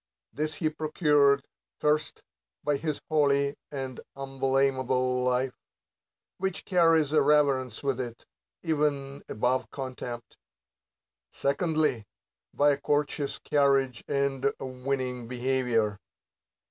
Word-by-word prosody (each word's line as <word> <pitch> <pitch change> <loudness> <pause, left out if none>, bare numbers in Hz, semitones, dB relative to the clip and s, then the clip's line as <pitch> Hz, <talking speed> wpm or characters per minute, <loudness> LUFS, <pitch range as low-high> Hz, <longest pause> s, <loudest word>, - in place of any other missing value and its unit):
This 155 0 -2
he 155 0 0
procures, 150 -3 +3 0.4
First, 150 0 0 0.4
by 145 -1 +1
his 155 0 -3
holy 140 -2 +2 0.2
and 135 -3 -5 0.2
umblamable 130 -2 +1
life; 125 +1 +1 0.9
which 190 -1 -2
carries 165 -5 +4
a 155 - +5
reverence 140 -5 +2
with 135 -2 0
it, 120 -2 -7 0.4
even 145 -4 0
above 125 +1 0
contempt. 125 -3 -7 0.9
Secondly, 150 - 0 0.4
by 145 0 +4
a 140 0 -2
courteous 145 0 0
carriage 135 -4 +2
and 140 -1 +1
winning 130 -2 -3
beha 130 +2 0
'ior. 110 -4 +1
140 Hz, 100 wpm, -28 LUFS, 130-150 Hz, 0.9 s, a